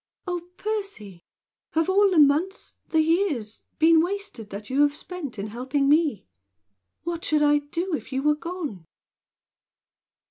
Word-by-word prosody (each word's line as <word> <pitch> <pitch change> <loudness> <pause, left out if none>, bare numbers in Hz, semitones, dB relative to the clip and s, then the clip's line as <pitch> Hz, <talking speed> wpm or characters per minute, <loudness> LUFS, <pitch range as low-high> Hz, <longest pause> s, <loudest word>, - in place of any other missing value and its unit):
Oh, 355 -2 -2 0.2
Percy! 395 - -4 0.5
Have 325 0 +2
all 400 +1 +4
the 365 - +1
months 310 +7 +3
the 320 - +3
years 315 - 0 0.2
been 320 0 +6
wasted 355 - -4
that 205 +1 -7
you 270 +2 +1
have 290 0 +3
spent 310 -7 -7
in 200 - -3
helping 255 +6 -1
me? 295 - +2 0.8
What 340 0 -4
should 300 -1 +2
I 295 0 +5
do 335 +5 -4
if 305 - -4
you 265 +1 -1
were 300 0 +4
gone?" 300 - -6
305 Hz, 145 wpm, -25 LUFS, 265-355 Hz, 0.8 s, been